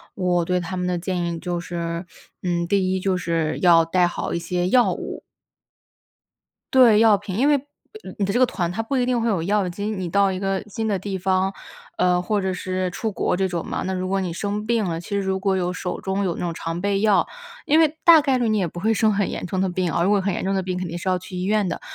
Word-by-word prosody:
我 180 -2 +1
对 180 +2 0
他 175 +1 -5
们 180 0 -2
的 180 -1 0
建 180 0 -2
议 170 -1 -3
就 175 +1 -3
是， 170 0 -4 0.4
嗯， 175 -1 -1
第 185 0 +1
1 190 - 0
就 190 0 0
是 165 -3 -1
要 170 -2 +6
带 180 +2 +2
好 175 - -3
一 - - -1
些 175 +1 -1
药 245 +5 +4
物。 - - -6 1.5
对， 240 -5 +7
药 220 -2 +6
品， 200 -2 -6
因 275 +5 +3
为， 295 - +5 0.5
呃， - - -9
你 205 - -1
的 200 - -1
这 245 - +1
个 255 - +6
团 175 -8 -2
它 195 - -2
不 225 +5 -3
一 250 -2 +2
定 245 -2 +1
会 230 - 0
有 195 -7 0
药 200 +1 +1
金。 200 +3 -4
你 185 - -3
到 200 +3 +2
一 185 - -3
个 195 0 -1
新 220 +2 -3
的 205 -2 +1
地 195 +1 -4
方， 190 +1 +1 0.4
呃， 180 0 +2
或 205 +3 0
者 190 -1 -1
是 185 0 -2
出 220 +4 -3
国 195 - 0
这 190 +1 0
种 170 -2 -3
嘛， - - -3
那 190 - -2
如 185 0 -2
果 195 +1 0
你 180 -2 -3
生 205 +4 -3
病 230 -1 +1
了， 165 -2 -3
其 - - -12
实 200 - -1
如 190 -1 -1
果 190 0 0
有 180 -1 -1
手 180 0 -4
中 190 +1 -2
有 175 -4 -1
那 - - -8
种 175 -1 -2
常 165 +1 -4
备 200 +1 0
药 210 -2 +3 0.4
因 305 - +4
为 320 -1 +3
大 330 -2 +8
概 270 -2 +1
率 240 -2 0
你 215 -1 +2
也 185 -4 +1
不 175 - -8
会 220 +5 +2
生 220 0 +3
很 200 -1 0
严 - - -5
重 185 +1 -3
的 190 - +2
病 180 -1 -1
啊， 170 - 0
如 180 - +2
果 205 -1 +3
很 195 0 -1
严 - - -3
重 195 +1 0
的 190 - 0
病 180 0 -3
肯 185 - -3
定 170 +1 -5
是 185 - -3
要 185 -1 +1
去 185 +1 -10
医 180 - -3
院 210 0 +1
的。 - - -4
190 Hz, 295 characters per minute, -22 LUFS, 180-205 Hz, 1.5 s, 大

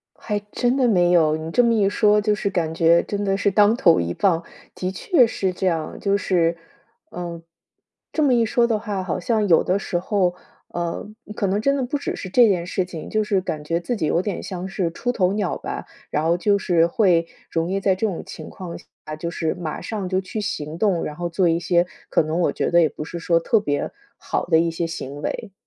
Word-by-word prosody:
还 210 -2 -3
真 245 +1 +1
的 260 -2 +3
没 175 -5 +3
有， 160 -3 +4
你 160 +1 -5
这 245 - +4
么 235 -1 +3
一 205 -3 +3
说 210 0 +3
就 210 0 +2
是 205 -1 -2
感 170 -4 -1
觉 165 +1 +4
真 205 0 -3
的 195 -1 +1
是 200 +1 +1
当 210 +2 +5
头 185 -9 +4
一 85 0 -1
棒， 170 - +1 0.3
的 185 0 -3
确 255 - +3
是 195 -4 -1
这 185 +1 -2
样。 165 -3 -2
就 200 0 +1
是， 170 -4 +1 0.6
嗯， 170 -1 -6 0.7
这 310 - +1
么 275 -3 +4
一 235 -1 +3
说 235 +2 +2
的 225 -2 0
话， 205 -3 -3
好 185 0 -2
像 215 +2 +1
有 165 -3 +5
的 185 - +1
时 180 - -2
候， 185 -1 0 0.3
呃， 170 -1 -3 0.3
可 200 - 0
能 195 +2 +1
真 275 +6 +2
的 270 - -1
不 255 +4 -2
只 285 - -4
是 190 - -7
这 235 +5 +6
件 180 -4 +1
事 185 0 -1
情， 170 -3 -8
就 215 0 +1
是 200 -2 +1
感 155 -5 -4
觉 165 +3 -1
自 245 +7 -2
己 160 - -1
有 165 +3 +2
点 200 0 -3
像 185 -1 -5
是 190 -3 -2
出 245 +8 -2
头 190 -5 +1
鸟 205 -3 -1
吧， - - -6 0.2
然 150 - -1
后 165 +2 +2
就 200 +3 +2
是 170 -3 +3
会 170 -3 +2 0.2
容 165 +1 -1
易 195 - 0
在 190 -1 +2
这 220 +4 0
种 185 -5 -4
情 155 - -9
况 180 -3 -8
下， - - -16 0.3
就 170 - -3
是 160 -2 -1
马 165 -3 -5
上 210 -4 -4
就 185 +1 0
去 190 +3 -5
行 155 -6 -4
动， 185 -3 +1
然 150 - -5
后 175 +2 -3
做 175 +1 +1
一 165 0 +1
些 175 0 +2 0.2
可 - - +3
能 160 +2 -2
我 175 - +2
觉 - - -1
得 170 - +5
也 160 - +4
不 150 - -7
是 170 +2 -6
说 170 0 +2
特 215 +6 +2
别 145 -8 -2 0.3
好 - - -2
的 160 - +4
一 170 +1 +2
些 165 +1 -2
行 145 -3 -6
为。 200 +5 -4
185 Hz, 255 characters per minute, -22 LUFS, 170-210 Hz, 0.7 s, 这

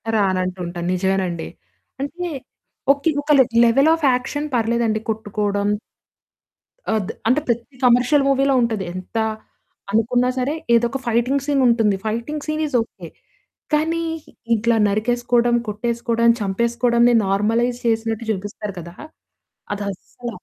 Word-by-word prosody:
రానంటుంటాను. 185 -3 -1
నిజమేనండి. 185 -2 -1 0.5
అంటే 350 +5 -4 0.7
ఓకే. 285 +3 -1
ఒక 300 - -1 0.3
లెవెల్ 275 +7 +4
ఆఫ్ 320 -3 -2
యాక్షన్ 270 +4 -2
పర్లేదండి 230 -1 +1
కొట్టుకోవడం. 205 -2 -1 1.3
ఆద్ 215 -1 -1 0.2
అంటే 255 +5 +4
ప్రతి 235 +3 -2
కమర్షియల్ 250 +4 +4
మూవీలో 275 0 +3
ఉంటది. 225 -4 0
ఎంత 185 +5 -7 0.7
అనుకున్నా 245 +3 +2
సరే 265 +4 0 0.2
ఏదో 235 +1 +3
ఒక 270 - -3
ఫైటింగ్ 250 +4 +1
సీన్ 285 -2 +1
ఉంటుంది. 225 -4 +3
Fighting 235 +8 -3
scene 310 0 -1
is 275 - -4
okay. 225 - -9 0.7
కానీ 325 +2 +1 0.5
ఇట్లా 235 +2 +1
నరికేసుకోవడం, 240 +3 +1
కొట్టేసుకోవడం, 235 +2 0
చంపేసుకోవడంని 235 +4 +2
నార్మలైజ్ 225 +5 +1
చేసినట్టు 225 0 -1
జూపిస్తారు 205 0 -5
కదా! 170 +1 -9 0.8
అదస్సల 205 +4 -6
235 Hz, 110 wpm, -21 LUFS, 205-250 Hz, 1.3 s, లెవెల్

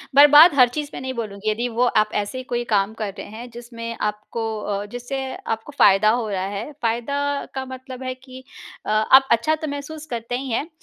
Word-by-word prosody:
बर्बाद 295 +3 +9
हर 250 -2 +7
चीज़ 295 +3 -4
में - - -5
नहीं 260 0 -4
बोलूँगी, 215 -3 -4
यदि 235 +3 -1
वो 250 - +4 0.2
आप 215 - -2
ऐसे 210 +5 -2
ही 255 - -5
कोई 240 -1 -2
काम 210 -1 +1
कर 215 -3 -5
रहे - - -7
हैं 235 +3 -9
जिसमें 230 -1 -7
आपको 210 +2 -3 0.2
अ, 205 0 -3
जिससे 245 +5 -5 0.3
आपको 225 +5 -3
फ़ायदा 200 +2 +5
हो 225 -1 0
रहा 190 -2 -2
है। 220 +9 -5
फ़ायदा 235 +5 -1 0.4
का 265 - -3
मतलब 260 0 -9
है 255 - -3
कि 260 0 -13 0.4
अ, - - -5
आप 260 +5 +5
अच्छा 235 +7 +3
तो 310 - -1
महसूस 295 +2 -6
करते 240 -2 -4
ही 265 0 -5
हैं 280 +7 -1
240 Hz, 210 wpm, -22 LUFS, 215-265 Hz, 0.4 s, बर्बाद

